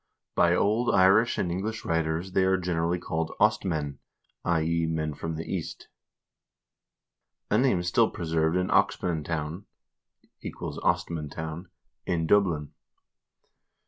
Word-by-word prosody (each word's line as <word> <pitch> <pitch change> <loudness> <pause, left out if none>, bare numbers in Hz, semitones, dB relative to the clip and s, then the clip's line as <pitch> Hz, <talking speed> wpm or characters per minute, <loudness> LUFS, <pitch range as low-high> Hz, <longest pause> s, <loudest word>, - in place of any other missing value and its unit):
By 85 0 +4
old 110 +6 +2
Irish 100 +5 +5
and 90 - -1
English 105 +5 -3
writers 80 +2 -1
they 95 - +2
are 95 0 +3
generally 85 -1 0
called 80 -2 -3
Ostmen 75 -6 +1 0.4
(i.e. 85 0 +1
men 80 -1 -2
from 80 +3 -5
the 80 - -5
East), - - -5 1.6
a 105 - +4
name 125 -9 +2
still 90 - +3
pre 85 - -6
served 80 +1 +1
in 90 0 0
Oxmantown 80 +1 0 0.4
( - - -61
= - - -34 0.4
Ostmantown) 85 -1 -2 0.4
in 85 -3 0
Dublin. 85 -6 +2
85 Hz, 120 wpm, -27 LUFS, 80-95 Hz, 1.6 s, Irish